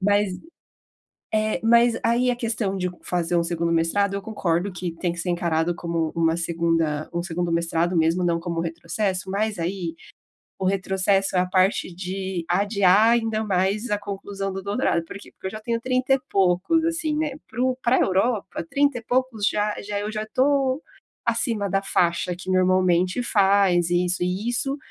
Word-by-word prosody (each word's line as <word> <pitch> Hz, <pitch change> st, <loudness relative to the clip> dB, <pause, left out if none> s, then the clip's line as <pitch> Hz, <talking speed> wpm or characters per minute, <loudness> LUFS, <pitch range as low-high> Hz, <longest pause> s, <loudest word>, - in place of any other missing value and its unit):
Mas 205 Hz, 0 st, +3 dB, 1.1 s
eh, 215 Hz, 0 st, +1 dB
mas 235 Hz, +1 st, +4 dB
aí 245 Hz, +2 st, +2 dB
a -, -, -1 dB
questão 220 Hz, -4 st, -2 dB
de 180 Hz, -1 st, -1 dB
fazer 175 Hz, -1 st, -1 dB
um 170 Hz, -, +2 dB
segundo 170 Hz, 0 st, -1 dB
mestrado, 180 Hz, +5 st, +1 dB
eu 200 Hz, -, -3 dB
concordo 190 Hz, -3 st, -1 dB
que 180 Hz, -1 st, -4 dB
tem 175 Hz, +1 st, -2 dB
que 170 Hz, -, -8 dB
ser 175 Hz, +1 st, -3 dB
encarado, 170 Hz, -1 st, 0 dB
como 170 Hz, -2 st, -2 dB
uma 165 Hz, 0 st, +2 dB
segunda 165 Hz, -2 st, 0 dB
um 170 Hz, -, -1 dB
segundo 175 Hz, -1 st, -2 dB
mestrado, 170 Hz, +1 st, 0 dB
mesmo, 165 Hz, +3 st, +2 dB
não 170 Hz, -1 st, +1 dB
como 170 Hz, -1 st, -3 dB
retrocesso, 185 Hz, +3 st, -3 dB
mas 210 Hz, -1 st, -1 dB
aí, 170 Hz, -1 st, -3 dB, 0.7 s
o 190 Hz, -, -2 dB
retrocesso 195 Hz, 0 st, +1 dB
é -, -, +5 dB
a 185 Hz, -, 0 dB
parte 185 Hz, -1 st, +1 dB
de 185 Hz, -1 st, -4 dB
adiar, 200 Hz, +3 st, +4 dB
ainda 225 Hz, -2 st, +1 dB
mais 195 Hz, +4 st, 0 dB
a 205 Hz, -, +1 dB
conclusão 200 Hz, -1 st, -5 dB
do 190 Hz, 0 st, -5 dB
doutorado 200 Hz, -4 st, 0 dB
por 165 Hz, -, -10 dB
quê? -, -, -14 dB
Porque -, -, -16 dB
eu 190 Hz, -, -5 dB
já 215 Hz, -, -7 dB
tenho 230 Hz, +1 st, -1 dB
30 255 Hz, +1 st, +1 dB
e -, -, -3 dB
poucos, 195 Hz, -, +2 dB
assim, 325 Hz, -2 st, -1 dB
né, 305 Hz, -2 st, -1 dB, 0.2 s
pro 255 Hz, +1 st, 0 dB
pra 240 Hz, +2 st, +3 dB
Europa, 195 Hz, -2 st, 0 dB
30 285 Hz, -2 st, +2 dB
e -, -, -15 dB
poucos 245 Hz, -3 st, 0 dB
já 210 Hz, 0 st, 0 dB
já 205 Hz, 0 st, -3 dB
eu 210 Hz, +1 st, -3 dB
já 215 Hz, 0 st, -3 dB
estou 270 Hz, +4 st, +1 dB, 0.4 s
acima 230 Hz, -3 st, 0 dB
da 195 Hz, +1 st, +1 dB
faixa, 175 Hz, -1 st, +1 dB
que 185 Hz, +1 st, -9 dB
normalmente 185 Hz, +2 st, +2 dB
faz 195 Hz, -5 st, +3 dB
e 175 Hz, +1 st, +2 dB
isso 180 Hz, 0 st, 0 dB
e 185 Hz, +6 st, -1 dB
isso 270 Hz, +3 st, -1 dB
195 Hz, 180 wpm, -24 LUFS, 175-220 Hz, 1.1 s, é